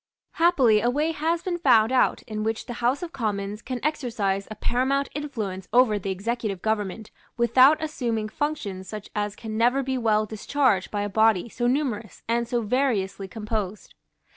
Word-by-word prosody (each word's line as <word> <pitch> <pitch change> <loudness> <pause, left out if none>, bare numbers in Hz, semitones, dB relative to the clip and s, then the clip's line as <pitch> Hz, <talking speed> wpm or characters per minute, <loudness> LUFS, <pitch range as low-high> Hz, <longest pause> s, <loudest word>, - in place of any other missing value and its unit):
Happily 270 - +4
a 240 - +2
way 300 +5 +1
has 325 +2 -1
been 350 -2 -2
found 235 -7 +5
out 260 - +2
in 215 -1 -5
which 220 +1 -2
the 245 - -6
House 255 +8 +1
of 340 - -5
Commons 210 -4 -3
can 255 0 -4
exercise 225 -10 -1
a 215 - -6
paramount 260 +5 0
influence 215 -11 -4
over 230 -3 +4
the 195 - -4
executive 205 0 -3
government, 215 -1 -2 0.3
without 255 +5 +6
assuming 235 -8 -2
functions 210 -10 -3
such 210 -2 -8
as 205 -1 -2
can 220 0 -6
never 250 +4 +3
be 260 0 -1
well 215 -2 +2
discharged 215 -1 0
by 205 -1 -2
a - - -1
body 220 0 +3
so 240 +2 -1
numerous 245 -5 -2
and 235 +1 0
so 240 0 0
variously 210 -5 0
composed. 210 -1 -4
230 Hz, 170 wpm, -25 LUFS, 210-260 Hz, 0.3 s, without